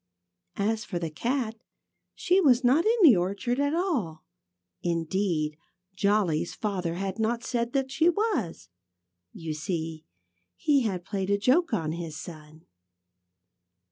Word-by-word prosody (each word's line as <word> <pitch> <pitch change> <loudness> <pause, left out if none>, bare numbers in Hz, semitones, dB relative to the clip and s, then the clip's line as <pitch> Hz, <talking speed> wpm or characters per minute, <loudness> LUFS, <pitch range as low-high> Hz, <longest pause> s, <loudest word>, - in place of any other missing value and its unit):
As 215 +2 0
for 185 - -4
the 165 -2 -3
cat, 230 - -2 0.5
she 370 +2 +3
was 260 -6 +4
not 270 +7 +4
in 455 - +4
the 280 -10 +9
orchard 200 +8 -1
at 285 +2 +1
all. 260 - -2 0.6
Indeed, 165 -2 -1 0.4
Jolly's 190 -4 +1
father 185 -6 -2
had 195 +3 -4
not 230 +2 0
said 235 0 -2
that 270 -1 0
she 320 +5 +3
was. 315 - -1 0.6
You 165 -2 -5
see, 160 0 -4 0.5
he 285 -2 +2
had 190 -7 -2
played 195 -1 -3
a 200 - +3
joke 270 - +2
on 165 -8 -1
his 165 -2 -5
son. 155 -1 -11
200 Hz, 135 wpm, -27 LUFS, 165-255 Hz, 0.6 s, the